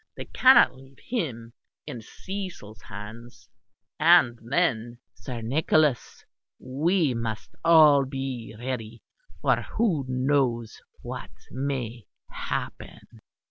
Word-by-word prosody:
They - - -6
cannot 255 - +6
leave 135 +1 -17
him 120 - -4 0.3
in 120 - -7
Cecil's 180 - -8
hands; 115 +3 -10 0.5
and 155 -7 +5
then, 120 -3 0 0.2
Sir 125 -4 -7
Nicholas, 145 +2 +1 0.3
we 150 +3 0
must 115 -2 -4
all 155 -4 +7
be 130 -4 -5
ready, 115 -2 -5 0.4
for - - +3
who 195 -11 0
knows 130 -3 0 0.2
what - - -6 0.2
may 125 -4 -4 0.2
happen." 115 - -6
130 Hz, 100 wpm, -26 LUFS, 115-150 Hz, 0.5 s, all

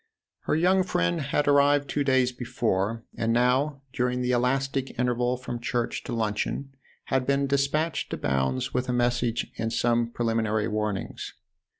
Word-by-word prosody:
Her - - +1
young 185 +4 +4
friend 85 - 0
had 145 +1 0
arrived 145 0 +4
two 145 - 0
days 130 -2 +3
before 115 -3 -1
and 115 0 0
now 130 +4 +2
during 125 0 0
the 125 - +1
elastic 135 +2 0
interval 125 0 +1
from 120 -1 -5
church 120 0 -2
to - - -5
luncheon 115 +5 -2 0.4
had 130 -1 +1
been 140 0 +2
despatched 140 +4 0
to - - -3
Bounds 65 - -1
with 125 0 -1
a - - +1
message 120 -1 0
and 115 0 -1
some 120 0 +1
preliminary 115 -2 0
warnings. 105 -2 -3
125 Hz, 155 wpm, -26 LUFS, 115-135 Hz, 0.4 s, young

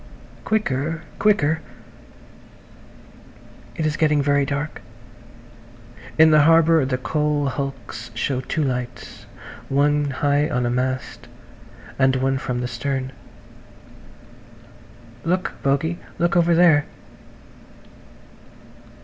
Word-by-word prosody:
"Quicker! 165 -6 -1 0.2
Quicker!" 160 -7 +2 2.1
It 160 - -2
is 155 0 -1
getting 150 -2 +2
very 140 -1 +2
dark. 145 +2 -4 1.4
In 160 0 +7
the 155 -1 +6
harbour 165 -1 +5
the 130 -1 -1
coal 150 +2 -1
hulks 135 0 -6
show 130 -2 -1
two 155 +4 -2
lights–one 140 +3 -3
high 145 +2 +1
on 125 -5 -1
a 120 - 0
mast, 125 -1 -3 0.7
and 130 -1 +4
one 135 +1 0
from 125 -1 -3
the 125 - -2
stern. 130 +2 -3 2.1
"Look, 180 +3 -1
Bogey. 140 +5 0 0.2
Look 170 0 +1
over 170 -1 +4
there." 165 -4 +5
145 Hz, 95 wpm, -22 LUFS, 130-160 Hz, 2.1 s, In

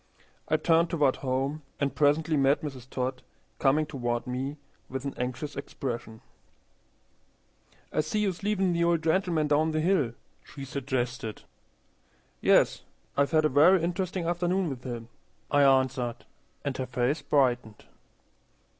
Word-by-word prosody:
I - - +3
turned 165 0 +3
toward 145 -6 +2
home, 135 +3 -1 0.2
and 140 -1 0
presently 155 +2 +2
met 140 +1 +3
Mrs. 130 -4 -7
Todd 130 0 -3 0.4
coming 150 +3 +3
toward 120 -5 -2
me 130 +4 -3 0.3
with 135 +1 -5
an 140 - -3
anxious 130 +4 -4
expression. 120 -5 -5 1.7
"I - - +3
see 155 +8 -1
you 205 -2 +2
sleevin' 195 0 0
the 170 0 +1
old 170 -1 +2
gentleman 165 -1 +2
down 155 +2 +2
the 155 - +1
hill," 155 -8 +2 0.3
she 140 -2 -9
suggested. 125 -4 -3 1.0
"Yes. - - +4 0.3
I've 140 0 +2
had 155 -1 +3
a - - +4
very 160 +6 +5
interesting 180 0 -2
afternoon 175 0 0
with 125 -2 -7
him," 120 -2 -6 0.4
I 145 - +4
answered, 130 -3 +2 0.4
and 140 -2 -1
her 130 - -3
face 125 +4 0
brightened. 125 -6 +1
140 Hz, 135 wpm, -28 LUFS, 130-160 Hz, 1.7 s, very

